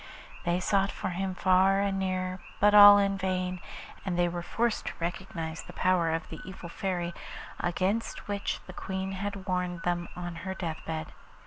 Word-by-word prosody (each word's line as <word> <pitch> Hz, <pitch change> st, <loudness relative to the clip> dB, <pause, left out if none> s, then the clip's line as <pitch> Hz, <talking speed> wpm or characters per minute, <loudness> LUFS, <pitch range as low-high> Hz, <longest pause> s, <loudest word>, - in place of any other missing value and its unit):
They 175 Hz, +1 st, +2 dB
sought 195 Hz, +1 st, +2 dB
for -, -, -4 dB
him 185 Hz, +1 st, -2 dB
far 190 Hz, +1 st, +4 dB
and 195 Hz, -1 st, 0 dB
near, 185 Hz, -1 st, -1 dB, 0.2 s
but 205 Hz, +1 st, +5 dB
all 205 Hz, 0 st, +11 dB
in 195 Hz, -1 st, +1 dB
vain, 185 Hz, -1 st, -1 dB, 0.4 s
and 185 Hz, -3 st, -2 dB
they 175 Hz, 0 st, +3 dB
were 175 Hz, 0 st, -3 dB
forced 230 Hz, +6 st, -1 dB
to -, -, -2 dB
recognise 170 Hz, -2 st, -4 dB
the -, -, -11 dB
power 180 Hz, -3 st, +3 dB
of 165 Hz, 0 st, -2 dB
the 160 Hz, -, -7 dB
evil 185 Hz, -2 st, -8 dB
Fairy, 175 Hz, -1 st, -2 dB, 0.5 s
against 190 Hz, +6 st, -1 dB
which 200 Hz, -1 st, -2 dB
the 185 Hz, -, -10 dB
Queen 190 Hz, +1 st, -4 dB
had 195 Hz, 0 st, -4 dB
warned 180 Hz, -2 st, -2 dB
them 175 Hz, -1 st, -1 dB
on 175 Hz, -1 st, -5 dB
her 190 Hz, +3 st, -5 dB
death 165 Hz, -4 st, -4 dB
bed. 160 Hz, -1 st, -4 dB
185 Hz, 180 wpm, -29 LUFS, 175-195 Hz, 0.5 s, all